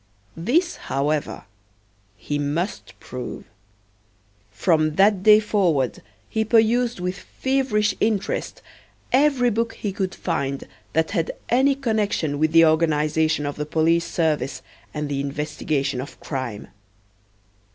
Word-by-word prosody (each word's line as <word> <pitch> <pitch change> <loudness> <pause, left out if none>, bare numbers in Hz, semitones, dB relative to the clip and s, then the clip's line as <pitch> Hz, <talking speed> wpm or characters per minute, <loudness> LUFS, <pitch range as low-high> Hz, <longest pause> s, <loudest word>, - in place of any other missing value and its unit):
This, 305 - +1
however, 145 +2 -2 0.7
he 145 +7 -3
must 155 +7 -3
prove. 125 -1 -7 1.0
From 155 -4 +1
that 195 0 +4
day 210 +1 +7
forward 180 - 0 0.3
he 220 - 0
perused 230 +1 +2
with 180 +2 -3
feverish 260 -6 0
interest 210 -3 -1 0.5
every 260 -3 +4
book 230 +1 -1
he 205 -3 -4
could 190 -1 -3
find 140 -5 -3 0.3
that 160 +1 +1
had 165 -5 0 0.2
any 270 +3 +3
connection 210 - -1
with 155 0 +2
the 165 0 +7
organization 155 -1 +2
of 145 - -4
the 150 - -2
police 165 +2 +2
service 155 -4 -1 0.3
and 150 -1 -3
the 140 -1 -2
investigation 140 -2 -2
of 140 - -10
crime. 130 -7 -5
165 Hz, 120 wpm, -23 LUFS, 150-215 Hz, 1.0 s, day